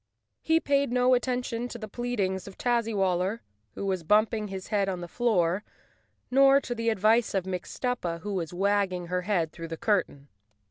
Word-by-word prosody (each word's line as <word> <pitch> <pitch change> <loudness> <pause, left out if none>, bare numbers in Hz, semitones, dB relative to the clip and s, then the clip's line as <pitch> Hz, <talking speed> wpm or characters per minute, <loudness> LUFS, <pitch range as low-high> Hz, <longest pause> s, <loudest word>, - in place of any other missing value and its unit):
He 320 0 +3
paid 280 -4 +1
no 250 +1 +4
attention 245 -1 -1
to 245 - -7
the 215 -2 -7
pleadings 200 -5 -2
of 195 - -11
Tazzywaller, 210 -4 0 0.3
who - - -4
was 190 -2 -1
bumping 215 +4 +2
his 190 -1 -7
head 200 -2 +1
on 185 -2 -3
the 175 - -6
floor, 190 -4 +1 0.7
nor 275 +1 +6
to 260 -3 -4
the 230 -1 -1
advice 220 +1 +2
of 190 -2 0
Mix 185 -2 -5
tuppa, 180 -10 -2
who 205 +3 -4
was 170 -5 -3
wagging 185 -2 0
her 180 0 0
head 180 -5 0
through 165 -1 -8
the 165 0 -6
cur¬ 205 -1 +2
tain. 140 0 -17
205 Hz, 185 wpm, -27 LUFS, 180-240 Hz, 0.7 s, nor